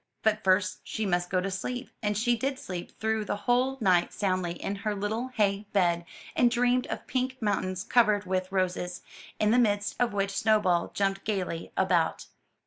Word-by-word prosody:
But 215 0 +2
first 185 0 +2
she 220 - -3
must 175 -2 0
go 185 -1 +1
to 195 +1 -3
sleep; 245 +6 -4
and 210 -2 0
she 240 +2 +2
did 270 +4 -2
sleep 180 -6 -7
through 220 0 0
the 205 - -2
whole 250 +5 +1
night 185 -5 +3
soundly 185 -3 -1
in 195 +3 -4
her 210 +1 -2
little 215 +5 -2
hay 210 -4 0
bed, 175 -3 +2 0.3
and 245 - +5
dreamed 245 +1 +2
of - - -5
pink 260 0 -2
mountains 190 -3 -1
covered 210 -4 +3
with 185 0 -1
roses, 180 -1 -1 0.4
in 215 0 +3
the 245 - +5
midst 205 -3 +1
of 245 - +2
which 200 -1 -1
Snowball 200 -5 +2
jumped 195 -1 0
gayly 185 -6 -3
about. 175 -4 +1
205 Hz, 180 wpm, -28 LUFS, 185-225 Hz, 0.4 s, and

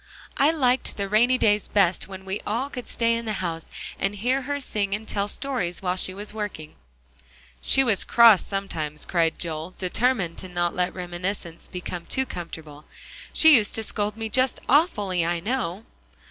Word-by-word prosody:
"I 280 - +5
liked 260 -5 +1
the 200 -1 -2
rainy 235 +5 +4
days 210 -3 +3
best 190 -3 +2
when 190 0 -9
we 190 +2 -3
all 245 +7 -1
could 250 -2 -7
stay 230 -1 +1
in 230 0 -2
the 215 - -2
house, 170 -4 -4 0.3
and 195 +1 0
hear 250 +6 0
her 285 +2 -3
sing 205 -7 -1
and 220 +1 -8
tell 200 0 -1
stories 205 -7 -3
while 180 -1 0
she 185 - 0
was 205 +2 -8
working." 205 -8 -5 0.9
"She 270 - +5
was 220 -6 +2
cross 230 -5 +6
sometimes," 160 -7 -3
cried 165 -3 +1
Joel, 165 +1 -4
determined 195 -2 0
not 175 0 +2
to - - -13
let 180 0 0
reminiscences 175 -1 -5
become 180 -2 -6
too 265 - 0
comfortable; 160 - -8 0.5
"she 315 -1 +6
used 215 -4 +3
to 225 - 0
scold 210 0 -1
me 225 0 -3
just 255 +3 +1
awfully, 210 - +2
I 170 +1 0
know." 195 -2 -2
200 Hz, 175 wpm, -25 LUFS, 175-235 Hz, 0.9 s, cross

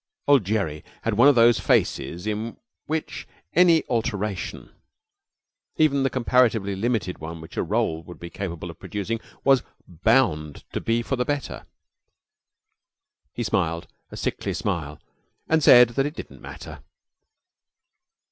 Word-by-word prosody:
Old 140 -8 +5
Gerry 95 -8 -1 0.2
had 115 - 0
one 120 +6 +6
of 145 - +6
those 115 -3 +5
faces 85 0 0
in 110 +2 -3 0.3
which 160 0 -4 0.3
any 170 -2 +5
alteration, 105 -5 -3 1.1
even 145 -3 +3
the 135 - +2
comparatively 115 -6 +2
limited 105 -3 -1
one 80 +1 -7
which 80 - -12
a - - 0
roll 80 0 0
would 85 +1 -12
be 85 0 -8
capable 85 -3 -5
of - - -18
producing, 105 +2 -4 0.2
was 135 -1 +5 0.3
bound 85 - +1
to - - -2
be 115 +1 0
for 135 - -2
the 125 - +1
better. 145 +1 -4 1.7
He - - -3
smiled 85 0 -1 0.2
a - - -9
sickly - - -3
smile 75 -3 -3 0.5
and 160 0 +3
said 125 -4 +8
that 135 +4 0
it 150 - -7
didn't - - -9
matter. - - -10
110 Hz, 140 wpm, -24 LUFS, 85-130 Hz, 1.7 s, said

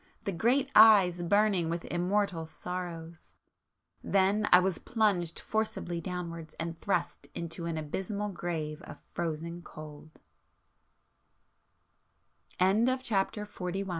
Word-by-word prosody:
the 200 - -2
great 250 +9 +2
eyes 195 -5 +7
burning 195 -2 +2
with 170 +1 -3
immortal 180 -2 0
sorrows!... 170 -1 -7 0.7
then, 200 +2 +2
I 180 - +10
was 185 -1 0
plunged 195 -7 0
forcibly 215 -6 -2
downwards 170 -3 -6
and 165 0 -3
thrust 195 -7 -1
into 170 0 -5
an 165 -1 -2
abysmal 195 +7 -3
grave 165 -4 -4
of - - -11
frozen 170 +1 -4
col 155 -2 -11
175 Hz, 95 wpm, -30 LUFS, 165-200 Hz, 0.7 s, I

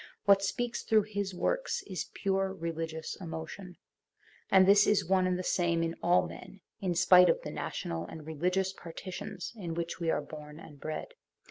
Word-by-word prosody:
What 200 0 +6
speaks 240 +4 -2
through 220 -1 +3
his 200 -2 -3
works - - -1
is 185 -3 -5
pure 195 0 0
religious 165 -3 -4
emotion; 170 +2 -7 0.7
and 190 -1 +7
this 200 +1 +7
is 200 -4 +3
one 185 0 +3
and 180 -1 +1
the 185 - -3
same 170 -2 +1
in 165 0 -1
all 175 +1 +3
men, 195 - -11 0.2
in 180 -3 -1
spite 180 0 +7
of - - +3
the - - -5
national 85 +1 -4
and 155 - -9
religious 180 +5 0
par 170 -3 -10
titions 185 +1 -6
in 175 -6 -5
which 170 +1 -3
we 165 -1 -1
are 150 - +1
born 150 0 -10
and 145 -3 -13
bred. 155 - -5
180 Hz, 185 wpm, -31 LUFS, 165-195 Hz, 0.7 s, and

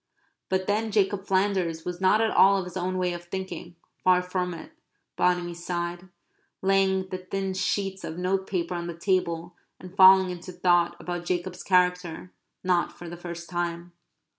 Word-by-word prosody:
But 190 0 0
then 215 +3 0
Jacob 200 -1 +1
Flanders 185 -4 0
was 180 0 -5
not 200 +4 +4
at 225 - +2
all 195 +1 +6
of 190 - -1
his 180 - -9
own 185 0 -2
way 180 -1 0
of 175 0 -8
thinking 180 -1 -6 0.3
far 180 -1 +4
from 180 0 -2
it, 165 - -10 0.4
Bonamy 180 -1 +1
sighed, 175 +1 -4 0.5
laying 190 -1 +2
the 185 - -4
thin 190 +1 -3
sheets 190 0 -1
of 160 - -6
notepaper 185 -1 -1
on 170 0 -4
the 170 - -5
table 175 -2 -1 0.2
and 185 0 -11
falling 190 -1 +7
into 180 +1 -8
thought 175 -1 +2
about 175 -1 -5
Jacob's 180 +1 -2
character, 180 -1 +1 0.3
not 180 -2 +1
for 175 - -11
the 170 - -7
first 170 -1 -8
time. 175 -1 -3
180 Hz, 165 wpm, -26 LUFS, 175-190 Hz, 0.5 s, falling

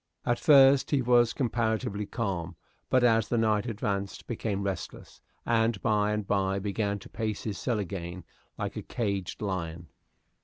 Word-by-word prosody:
At 120 0 +1
first 135 0 +6
he 140 -3 +2
was 120 -1 +4
comparatively 110 -4 -1
calm, 95 -7 -3 0.3
but 130 -1 +3
as 115 -2 +4
the 120 - 0
night 110 0 +2
advanced 100 -3 -3
became 105 -4 -3
restless, 95 -1 -6 0.2
and 115 -2 +2
by 105 -2 +2
and 105 -1 -2
by 95 -1 +1
began 100 +1 -1
to - - -13
pace 110 -2 -3
his 105 -3 -4
cell 120 -4 0
again 90 -3 -5 0.3
like - - -4
a - - -4
caged 100 -3 -3
lion. 85 -4 -4
105 Hz, 155 wpm, -28 LUFS, 100-115 Hz, 0.3 s, first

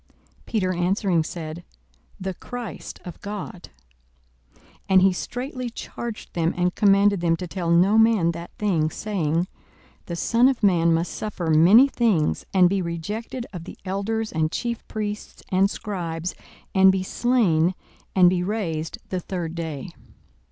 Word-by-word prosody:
Peter 185 -5 0
answering 180 -1 +1
said, 160 +1 -6 0.6
The 190 0 -3
Christ 235 0 -7
of 175 - -9
God. 200 -3 -7 0.9
42:009:021 - - -28 0.3
And 190 -1 +6
he 190 -1 +5
straitly 250 +5 -4
charged 235 -1 -7
them, 165 -1 0
and 180 0 +1
commanded 200 -1 +4
them 165 -1 +2
to 180 - -6
tell 175 -1 -3
no 185 +6 +5
man 220 -7 +4
that 170 +1 -7
thing; 170 -7 +1
42:009:022 - - -14
Saying, 175 -4 -1 0.6
The 170 - -4
Son 235 +8 +3
of 255 -4 -2
man 170 -4 +4
must 165 +2 0
suffer 185 -6 -3
many 185 - +7
things, 220 - +1
and 185 -2 +5
be 195 +1 0
rejected 205 +9 -4
of 170 -2 -7
the - - -10
elders 215 +4 -2
and 155 0 0
chief 235 -2 -3
priests 210 -1 -5
and 190 +1 +3
scribes, 175 -5 -4 0.4
and 190 0 +7
be 190 -1 -1
slain, 185 -7 +2 0.4
and 185 -2 +7
be 180 0 +2
raised 175 -5 -2
the 185 - -1
third 175 -2 -4
day. 165 -1 -5
185 Hz, 150 wpm, -24 LUFS, 170-210 Hz, 0.9 s, many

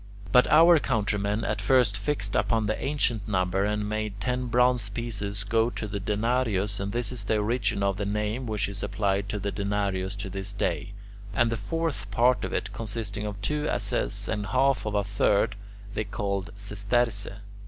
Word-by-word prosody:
But 125 +1 +6
our 165 +1 +7
countrymen 105 -4 0
at - - -1
first 125 -6 +3
fixed 100 -1 -2
upon 110 +2 +2
the 110 +1 0
ancient 120 -7 +1
number 95 -1 +1
and 105 0 -1
made 105 -1 -3
ten 125 +1 -1
bronze 125 -2 +3
pieces 100 -2 -2
go 115 +2 +2
to 110 - -4
the 100 0 -3
denarius, 105 -1 0
and 100 +1 -2
this 120 +3 -1
is 120 -5 -2
the 110 - +2
origin 105 -1 0
of 100 -1 +1
the 100 - -2
name 105 +4 -2
which 110 -1 0
is 100 0 -7
applied 100 -1 0
to 105 - -2
the 100 0 -2
denarius 100 -2 -1
to 100 -1 -5
this 100 +1 -5
day. 95 -1 -2 0.4
And 120 +2 +3
the - - +1
fourth 165 -3 -3
part 120 +5 +3
of - - -3
it, 100 -1 -2
consisting 110 -1 -3
of 100 -1 -6
two 150 +6 0
asses - - -1
and 105 -2 -2
half 130 -2 +2
of 105 - -2
a 100 - +2
third, 100 +1 +2 0.4
they 110 - -2
called 100 -1 -2
"sesterce." 105 +2 0
105 Hz, 185 wpm, -27 LUFS, 100-120 Hz, 0.4 s, our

